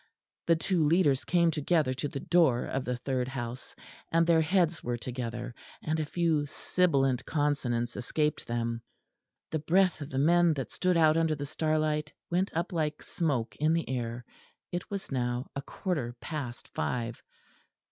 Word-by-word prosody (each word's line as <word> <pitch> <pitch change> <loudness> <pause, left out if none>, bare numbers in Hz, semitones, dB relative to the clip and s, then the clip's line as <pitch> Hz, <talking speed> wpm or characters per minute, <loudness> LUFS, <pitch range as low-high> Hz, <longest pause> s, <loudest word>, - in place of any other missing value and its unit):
The 165 - +6
two 170 0 +1
leaders 145 -5 +3
came 170 -2 +3
together 155 -2 +1
to 130 +3 -3
the 140 - -5
door 155 -7 +3
of 135 -1 -2
the 125 0 -1
third 125 0 -1
house, 125 -1 -6 0.4
and 165 0 +4
their 165 -1 +5
heads 170 0 +2
were 120 0 -1
together; 120 0 -5 0.3
and 160 0 0
a 155 - -1
few 160 -3 +1
sibilant 140 -6 +1
consonants 130 -6 0
escaped 150 +4 -1
them. 115 -1 -2 0.7
The 160 - 0
breath 180 +2 +3
of 145 - -5
the 130 - -4
men 170 +3 +4
that 135 -3 -4
stood 180 -2 +1
out 160 -1 +5
under 165 -1 +2
the 145 0 -4
starlight 155 0 0 0.2
went 185 +3 +2
up 170 +2 -1
like 155 -2 -1
smoke 140 -9 -1
in 155 +2 +2
the 165 0 0
air. 120 -1 -3 0.5
It 175 - -4
was 200 -5 -5
now 125 -1 -1
a 140 - -2
quarter 140 -6 -3
past 135 -7 -5
five. 120 -1 -3
150 Hz, 165 wpm, -30 LUFS, 125-165 Hz, 0.7 s, The